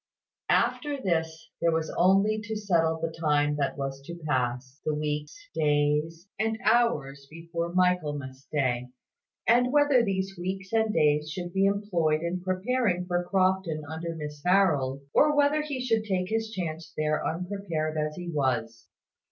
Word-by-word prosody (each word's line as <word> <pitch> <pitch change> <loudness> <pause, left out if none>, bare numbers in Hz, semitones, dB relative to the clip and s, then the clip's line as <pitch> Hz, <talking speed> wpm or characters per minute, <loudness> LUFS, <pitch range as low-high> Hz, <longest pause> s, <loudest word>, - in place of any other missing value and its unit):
After 290 -2 +1
this, 160 -6 -2
there 170 - +3
was 160 -1 -1
only 195 +4 +3
to 220 +1 -4
settle 165 -6 +1
the 165 0 -2
time 150 -2 +1
that 140 0 -1
was 135 -1 -4
to 170 0 -6
pass 130 0 -1
the 155 - 0
weeks, 150 - -3 0.2
days, 150 +2 +1
and 220 0 0
hours 150 -13 +2
before 170 +1 -4
Michaelmas 150 -7 0
day; 125 -4 0 0.6
and 245 +2 +4
whether 290 -4 +4
these 195 -2 -2
weeks 190 +2 -4
and 220 -1 +2
days 150 -3 +2
should 175 +2 -5
be 195 0 +3
employed 180 -6 +1
in 175 +2 -2
preparing 185 0 0
for 175 0 0
Crofton 185 -4 +1
under 165 +2 -5
Miss 150 -2 -7
Harold, 155 -8 +2
or 295 0 +4
whether 290 +1 +4
he 290 -3 -4
should 230 -3 +1
take 185 -3 -1
his 225 0 -1
chance 170 -6 -5
there 155 0 0
unprepared 175 -3 -3
as 150 0 -1
he 175 -1 -7
was. 130 -7 -1
170 Hz, 150 wpm, -27 LUFS, 150-195 Hz, 0.6 s, and